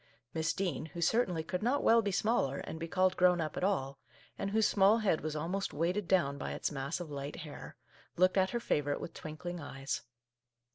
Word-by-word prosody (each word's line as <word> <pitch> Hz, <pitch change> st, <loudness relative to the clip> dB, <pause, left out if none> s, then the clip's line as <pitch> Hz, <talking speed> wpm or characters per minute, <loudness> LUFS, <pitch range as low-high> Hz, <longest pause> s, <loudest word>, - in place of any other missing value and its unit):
" 120 Hz, 0 st, -49 dB
Miss 160 Hz, -1 st, 0 dB
Dean, 165 Hz, -5 st, -2 dB
who 160 Hz, +2 st, -9 dB
certainly 175 Hz, -2 st, +2 dB
could 180 Hz, +3 st, -3 dB
not 255 Hz, +6 st, +1 dB
well 230 Hz, 0 st, +6 dB
be 205 Hz, -2 st, -1 dB
smaller 195 Hz, -, +1 dB
and 160 Hz, -, -6 dB
be 165 Hz, -, -4 dB
called 185 Hz, +1 st, +2 dB
grown 180 Hz, -1 st, +4 dB
up 155 Hz, -2 st, -2 dB
at -, -, -3 dB
all, 140 Hz, -9 st, 0 dB, 0.4 s
and 195 Hz, -, -3 dB
whose 220 Hz, +1 st, +3 dB
small 200 Hz, +2 st, +5 dB
head 205 Hz, -8 st, +1 dB
was 155 Hz, 0 st, -3 dB
almost 180 Hz, +6 st, -2 dB
weighted 175 Hz, +5 st, 0 dB
down 140 Hz, -7 st, +2 dB
by -, -, -3 dB
its -, -, -2 dB
mass 140 Hz, +3 st, -3 dB
of 170 Hz, -4 st, -7 dB
light 140 Hz, +1 st, -5 dB
hair, 150 Hz, -2 st, -9 dB, 0.4 s
looked 185 Hz, +1 st, +4 dB
at 190 Hz, -1 st, +3 dB
her 235 Hz, -, -1 dB
favour 145 Hz, -10 st, 0 dB
ite -, -, -4 dB
with -, -, -6 dB
twinkling 175 Hz, +3 st, -6 dB
eyes. 135 Hz, -2 st, -4 dB
170 Hz, 220 wpm, -33 LUFS, 150-195 Hz, 0.4 s, well